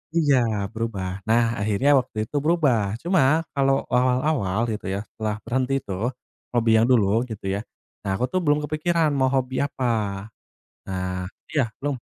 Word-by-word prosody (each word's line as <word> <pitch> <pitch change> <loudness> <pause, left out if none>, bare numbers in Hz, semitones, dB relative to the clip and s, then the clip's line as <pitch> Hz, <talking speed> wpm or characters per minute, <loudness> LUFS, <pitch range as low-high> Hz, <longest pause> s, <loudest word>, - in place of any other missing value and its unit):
Iya, 145 -5 +4 0.3
berubah. 100 -5 -3
Nah, 115 +2 +4 0.2
akhirnya 105 +7 +2
waktu 110 -4 -3
itu 110 - -10
berubah. 140 - +2
Cuma, 165 -3 +3
kalo 135 -1 +2
awal-awal 125 -5 +1
gitu 105 -3 -5
ya, 100 +1 -2
setelah 110 -1 -3
berhenti 130 +3 -1
itu, - - -8 0.6
hobi 115 -1 +3
yang 115 - +3
dulu 110 -3 +3
gitu 100 -4 -4
ya, 100 - -1 0.4
nah, 95 -2 -2
aku 110 - -2
tuh 185 - +1
belum 150 -3 +1
kepikiran 155 +1 +1
mau 130 - +4
hobi 130 0 0
apa. 140 -2 -2 1.1
Nah 90 0 -3 0.2
iya, 130 -7 +1
belum. 145 0 -2
125 Hz, 155 wpm, -24 LUFS, 105-145 Hz, 1.1 s, Iya